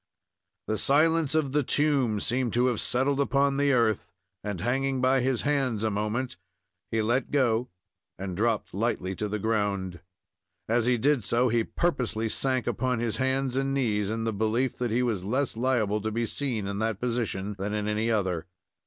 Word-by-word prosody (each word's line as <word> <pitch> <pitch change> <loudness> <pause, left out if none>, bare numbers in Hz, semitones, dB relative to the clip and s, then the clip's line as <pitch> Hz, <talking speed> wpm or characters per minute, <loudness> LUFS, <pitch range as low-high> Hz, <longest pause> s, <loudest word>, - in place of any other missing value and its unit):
The 110 -1 -1
silence 155 +2 +3
of 150 -4 +1
the 150 +2 +2
tomb 135 -6 +2
seemed 120 +1 0
to 120 +1 +3
have 125 -4 +1
settled 135 +3 +1
upon 140 0 +2
the 140 0 +3
earth, 115 -5 +1 0.3
and, 105 -3 -4
hanging 135 +5 0
by 130 +1 +3
his 130 -1 0
hands 135 -7 0
a 110 - +1
moment, 110 +5 -2 0.5
he 110 -1 0
let 120 +5 0
go 125 -4 +1 0.5
and 95 -1 -5
dropped 110 +2 0
lightly 95 -3 -1
to 105 - -2
the 105 +1 -2
ground. 100 -4 -1 0.7
As 115 +1 +2
he 125 -1 +3
did 135 0 +2
so, 120 +4 +2
he 115 0 +2
purposely 120 -10 -1
sank 130 +2 0
upon 130 -1 0
his 115 -2 -1
hands 130 0 0
and 135 0 0
knees, 105 -6 0
in 115 +1 -2
the 115 -1 -1
belief 110 +5 0
that 120 -1 0
he 120 +3 +1
was 110 -7 -1
less 130 +7 -1
liable 110 -4 +1
to 110 +1 -2
be 115 +2 -1
seen 120 -4 -2
in 100 0 -3
that 110 -2 -1
position 115 -5 -2
than 105 +2 -2
in 105 0 -2
any 110 +2 0
other. 95 -6 0
120 Hz, 185 wpm, -27 LUFS, 105-130 Hz, 0.7 s, silence